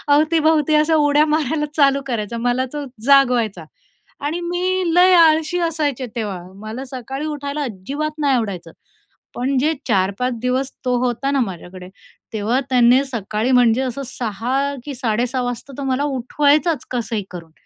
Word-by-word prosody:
अवतीभवती 310 0 +3
अशा 305 +1 +3
उड्या 295 0 +4
मारायला 300 -1 0
चालू 275 -1 +4
करायचा, 230 -1 -3
मला 245 +2 0
तो 295 -1 -4 0.2
जागवायचा. 245 - +3 0.5
आणि 300 +5 -2
मी 365 +2 -1
लय 365 +1 +6
आळशी 320 +1 +4
असायचे 290 -5 -2
तेव्हा, 205 -6 -3 0.2
मला 225 +5 -6
सकाळी 265 +2 -6
उठायला 290 0 -4
अजिबात 275 +7 -4
नाही 285 -3 +2
आवडायचं. 195 -8 -3 0.6
पण 260 +2 -1
जे 305 +5 +2
4-5 200 +4 +1
दिवस 255 +2 -1
तो 250 -1 +1
होता 245 +3 -1
ना 275 - +1
माझ्याकडे, 180 -3 -6 0.5
तेव्हा 220 +5 0
त्याने 250 +1 +5
सकाळी 225 0 -2
म्हणजे 245 0 +4
असं 265 +1 -3
6.00 235 -1 -4 0.3
कि 290 - -5
6.30 245 +1 -1
वाजता 245 +3 -5
तो 280 - -4
मला 265 +1 0
उठवायचाचं 290 +3 +1
कसंही 225 -3 -2
करून. 165 -3 -9
260 Hz, 145 wpm, -20 LUFS, 235-295 Hz, 0.6 s, लय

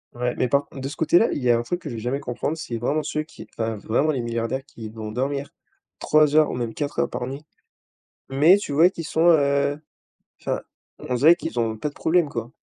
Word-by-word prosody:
Ouais, 125 0 -1
mais 125 - +1
par 140 +3 +2
con 135 - -11
de 135 - -4
ce 150 - -8
côté-là, 175 +7 +3
il - - -2
y 120 - +4
a 115 - +4
un - - -1
truc 175 +9 -4
que 150 - -6
je - - -6
vais - - -5
jamais 130 +4 -2
comprendre, 145 +6 -3
c'est 120 -7 -5
vraiment 145 +6 -1
ceux 155 - -2
qui 155 - -12
enfin, 115 -1 -2
vraiment, 120 +9 0
les 135 -5 0
milliardaires 115 +3 -3
qui 110 -5 -9
vont 110 -1 -7
dormir 140 +4 -2 0.5
3 150 -1 +3
heures 155 -1 +5
ou - - -4
même 120 -2 -3
4 145 -1 -4
heures - - +1
par 125 - -4
nuit. 140 +3 -7 0.8
Mais 150 +8 +5
tu 200 -8 -5
vois 165 +5 +6
qu'ils 170 -3 -7
sont, 160 +2 +1
heu 140 -1 +2 0.6
enfin, - - -2 0.4
on 125 - -4
dirait 155 +8 +6
qu'ils 165 -8 -3
ont 110 -1 -1
pas 145 +7 -3
de - - -23
problème 165 -1 +2
quoi. 115 -3 -5
140 Hz, 240 wpm, -23 LUFS, 120-155 Hz, 0.8 s, vois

